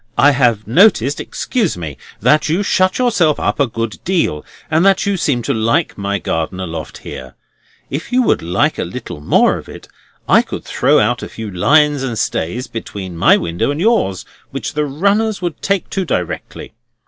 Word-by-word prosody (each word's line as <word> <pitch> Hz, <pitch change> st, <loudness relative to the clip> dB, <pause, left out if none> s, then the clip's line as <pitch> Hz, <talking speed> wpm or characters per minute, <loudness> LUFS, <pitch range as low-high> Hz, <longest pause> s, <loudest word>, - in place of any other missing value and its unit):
"I 145 Hz, -, +6 dB
have 120 Hz, -6 st, +2 dB
noticed 140 Hz, -, +4 dB
(excuse 220 Hz, -, -2 dB
me) 80 Hz, -5 st, -6 dB, 0.3 s
that 150 Hz, 0 st, +3 dB
you 175 Hz, +6 st, +1 dB
shut 185 Hz, -1 st, +2 dB
yourself 200 Hz, -, +2 dB
up -, -, -1 dB
a 140 Hz, -, +3 dB
good 115 Hz, -1 st, -4 dB
deal, 170 Hz, -, 0 dB, 0.3 s
and 160 Hz, +2 st, +3 dB
that 195 Hz, 0 st, +3 dB
you 200 Hz, 0 st, +1 dB
seem 140 Hz, -9 st, 0 dB
to -, -, 0 dB
like 115 Hz, +9 st, +1 dB
my 100 Hz, 0 st, -2 dB
garden 80 Hz, 0 st, -3 dB
aloft 80 Hz, -4 st, -6 dB
here. 65 Hz, 0 st, -8 dB, 0.6 s
If 150 Hz, -, -4 dB
you 255 Hz, +1 st, +3 dB
would -, -, +2 dB
like 85 Hz, +2 st, 0 dB
a -, -, 0 dB
little 75 Hz, -, -7 dB
more -, -, +3 dB
of -, -, -13 dB
it, -, -, -11 dB, 0.4 s
I -, -, +6 dB
could -, -, -7 dB
throw -, -, +2 dB
out -, -, +1 dB
a -, -, -6 dB
few 110 Hz, -2 st, -7 dB
lines 145 Hz, -, +3 dB
and 120 Hz, -4 st, -3 dB
stays 115 Hz, +10 st, -2 dB
between 100 Hz, -5 st, -7 dB
my 80 Hz, -, +5 dB
windows 85 Hz, +6 st, -2 dB
and 145 Hz, -, -5 dB
yours, 180 Hz, -, +1 dB, 0.2 s
which 130 Hz, -5 st, -5 dB
the 150 Hz, -1 st, 0 dB
runners 200 Hz, +9 st, +1 dB
would 175 Hz, -3 st, -4 dB
take 195 Hz, -1 st, 0 dB
to 195 Hz, -, -1 dB
directly. 90 Hz, -, -4 dB
140 Hz, 185 wpm, -17 LUFS, -, 0.6 s, I